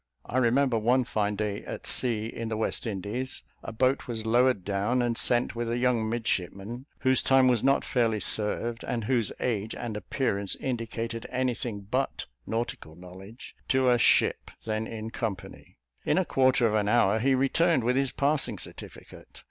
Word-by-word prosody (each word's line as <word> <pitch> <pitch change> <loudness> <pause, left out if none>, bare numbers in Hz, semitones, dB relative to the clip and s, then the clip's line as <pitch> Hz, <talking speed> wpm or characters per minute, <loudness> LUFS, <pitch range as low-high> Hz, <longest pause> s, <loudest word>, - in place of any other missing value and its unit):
I 130 - 0
remember, 125 0 +2
one 125 +4 +3
fine 105 -3 -1
day 105 -1 -3
at - - -7
sea, 115 -4 +2
in 115 0 -5
the 110 - -2
West 110 +2 -2
Indies, 110 +6 -4 0.2
a - - -6
boat 130 +5 +1
was 115 -2 -4
lowered 120 -3 +3
down, 100 +5 0
and 120 -1 +1
sent 120 +1 +1
with 120 0 -2
a 120 - 0
young 120 -3 +1
midshipman 115 - -3
(whose 130 -1 +4
time 135 -1 +4
was 120 -3 +2
not 135 +1 +3
fairly 115 -4 +1
served, 115 +3 -1
and 120 -2 -2
whose 115 -1 +1
age 110 -3 -2
and 115 -3 -5
appearance 100 -3 -1
indicated 115 -2 -4
anything 120 -4 -2
but 125 +7 -2 0.2
nautical 110 -8 -4
knowledge) 95 +6 -12
to 130 -2 +3
a 120 - +3
ship - - +3 0.2
then 110 0 -2
in 110 0 -6
company; 100 -6 -6 0.3
in - - +1
a - - +2
quarter 130 -2 +3
of 110 - +2
an 105 -1 +1
hour 105 +1 +3
he 135 +3 +3
returned, 135 +3 +2
with 125 +2 +1
his 135 0 +2
passing 140 -6 0
certificate. - - -11
115 Hz, 170 wpm, -28 LUFS, 105-125 Hz, 0.3 s, whose